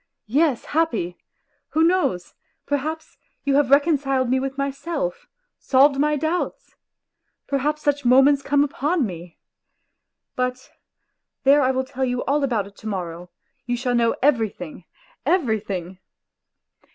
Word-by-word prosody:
Yes, 275 +2 +1
happy; 235 - -1 0.6
who 320 - +3
knows, 330 - +1 0.3
perhaps, 310 +3 -3 0.3
you 280 - +1
have 290 -3 +2
reconciled 275 -3 +2
me 260 - +3
with 270 +1 -4
myself, 340 - -3 0.3
solved 275 +1 +4
my 300 +1 +2
doubts!... 320 +4 -3 0.7
Perhaps 295 +2 -1
such 285 0 +1
moments 270 +3 +5
come 285 +1 +2
upon 295 +2 0
me.... 175 -3 -8 1.0
But 250 0 -3 0.7
there 280 +2 +6
I 260 - +2
will 260 0 0
tell 265 0 -4
you 250 -1 -1
all 285 +2 +1
about 235 -7 0
it 200 0 -15
to 220 - -9
morrow, 175 -3 -5 0.4
you 245 0 0
shall 245 0 -1
know 235 -1 +2
everything, 220 - 0 0.4
everything. 215 - -1
270 Hz, 125 wpm, -22 LUFS, 235-295 Hz, 1.0 s, there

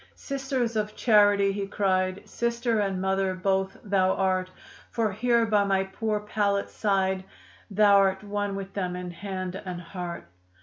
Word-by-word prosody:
"Sister 270 -2 -2
of 215 -2 -2
Charity!" 205 -3 +4
he 195 0 -3
cried, 185 -2 0
"Sister 235 -1 0
and 195 -2 0
mother 190 0 0
both 190 +1 0
thou 190 -2 +2
art; 185 -1 0 0.4
For 225 -3 0
here 235 +3 +2
by 210 -2 +3
my 195 -1 +2
poor 210 +2 -2
pallet 205 -1 -1
side, 190 -2 0 0.5
Thou'rt 200 -1 +4
one 205 -1 -2
with 195 0 -6
them 180 -3 -2
in 180 0 -5
hand 185 0 -5
and 180 -3 -5
heart." 175 - -6
195 Hz, 145 wpm, -27 LUFS, 190-210 Hz, 0.5 s, Charity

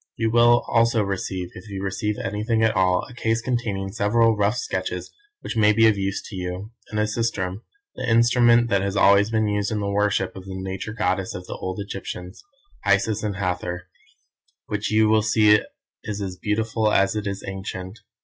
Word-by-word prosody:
You 110 -1 0
will 120 +1 +5
also 115 -1 +3
receive, 95 -2 -3
if 105 +4 -11
you 95 -1 -5
receive 100 +2 -2
anything 110 +3 -1
at 110 - +2
all, 90 -1 +2
a - - -13
case 115 -2 0
containing 110 -6 -2
several 115 +2 +2
rough 105 +3 +1
sketches - - -3 0.3
which - - -5
may 105 -1 +4
be 115 +1 +4
of 110 - +4
use 100 0 -2
to 105 - -9
you, 90 +3 -5 0.2
and 105 - -2
a - - +3
sistrum, 105 -3 -2 0.3
the - - -4
instrument 120 +1 +4
that 100 - +3
has 100 0 -2
been 95 - +3
always 100 +2 +5
used 105 -2 0
in 110 - -1
the 100 -1 -2
worship 100 -2 0
of 95 -1 -9
the 95 -1 -7
Nature 95 +2 -5
goddesses 95 -4 -1
of 90 - -7
the - - -6
old 95 +2 -5
Egyptians, 95 -2 -7 0.4
Isis 100 +2 +2
and 105 -2 -2
Hathor, 90 -2 -3 0.8
which 105 0 -3
you 110 0 +4
will 110 0 +4
see 105 -1 +5 0.4
is 105 -1 -4
as 95 -2 -4
beautiful 110 +2 0
as 100 +1 +2
it 105 -1 -2
is 100 -1 -4
ancient. 95 +1 -6
105 Hz, 190 wpm, -23 LUFS, 95-110 Hz, 0.8 s, will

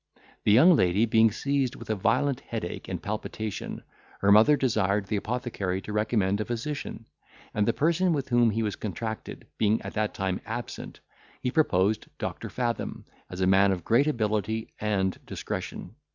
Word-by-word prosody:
The - - +5
young 160 - +7
lady 95 -1 +3
being 115 0 +5
seized 135 +3 -1
with - - -6
a - - +1
violent 125 +7 +1
headache 110 -10 -5
and - - -3
palpitation, 110 0 -5 0.4
her 100 - +4
mother 110 +8 +7
desired 105 -6 +1
the 105 - -2
apothecary 105 -4 -2
to 105 - -6
recommend 105 -2 +1
a - - -2
physician; 120 -1 -4 0.5
and 105 -1 +1
the - - +5
person 170 +4 +2
with 140 -5 -1
whom 120 -1 +4
he 110 +1 0
was 105 -3 -2
contracted 110 +1 -5
being 110 +1 +3
at - - -6
that 110 0 -1
time 95 -2 -2
absent, - - -6 0.4
he 125 - 0
proposed 110 - +2
Doctor - - -4
Fathom 120 -2 -3 0.2
as 90 - -6
a - - +3
man 95 +1 +5
of 90 -3 -3
great 125 +6 +4
ability 110 -4 -1
and 95 -3 -1
discretion. - - -5
110 Hz, 165 wpm, -27 LUFS, 100-125 Hz, 0.5 s, young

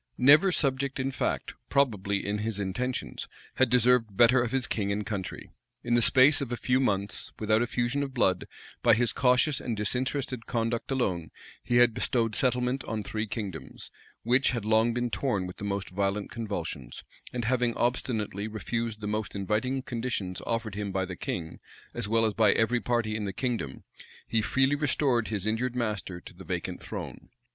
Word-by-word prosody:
Never 150 +9 +6
subject 140 -4 +1
in 130 +1 -1
fact, 130 - -2 0.2
probably 105 -8 +1
in 105 +1 -1
his 105 -1 -3
intentions, 125 +7 -3 0.3
had 130 - +4
deserved 125 -4 +3
better 120 +3 +6
of 120 -1 -1
his 135 -2 +1
king 100 -3 -1
and 105 +1 -2
country. 100 -4 -5 0.3
In 120 - 0
the 120 - +4
space 135 +5 +6
of 130 -3 -3
a 120 - -1
few 125 +2 +1
months, 100 -6 -1
without 110 +1 +2
effusion 120 +3 0
of 140 -1 -3
blood, 95 -8 +1 0.3
by - - +6
his 120 0 +1
cautious 125 +3 +3
and 115 -3 -3
disinterested 130 +3 -2
conduct 115 0 -1
alone, 95 - -1 0.3
he 120 - 0
had 120 -1 +6
bestowed 115 -1 0
settlement 125 +2 +1
on 110 -2 -3
three 110 +1 -3
kingdoms, 95 - -6 0.3
which 125 +3 +3
had 115 -5 -2
long 110 +2 +3
been 120 0 -2
torn 105 -9 0
with 90 - -8
the 105 - -6
most 100 -1 -3
violent 100 +2 -1
convulsions; 85 - -5 0.3
and 120 -2 -3
having 120 0 +1
obstinately 110 -4 -1
refused 110 0 -3
the 105 - -3
most 105 -1 -3
inviting 110 +7 -1
conditions 115 -7 -3
offered 115 -2 -2
him 105 0 -3
by 95 0 0
the 90 -1 -6
king, 80 -3 -5 0.3
as 120 -3 -2
well 115 +1 +3
as 110 - +1
by 105 -2 +4
every 120 +2 +2
party 120 -3 0
in 105 -1 -2
the 100 - -2
kingdom, 115 - -3 0.4
he 115 - +1
freely 135 +5 +2
restored 140 -5 +1
his 105 -3 -3
injured 120 +3 0
master 105 -7 -2
to - - -13
the - - -12
vacant - - -4
throne. - - -7
115 Hz, 180 wpm, -28 LUFS, 105-125 Hz, 0.4 s, Never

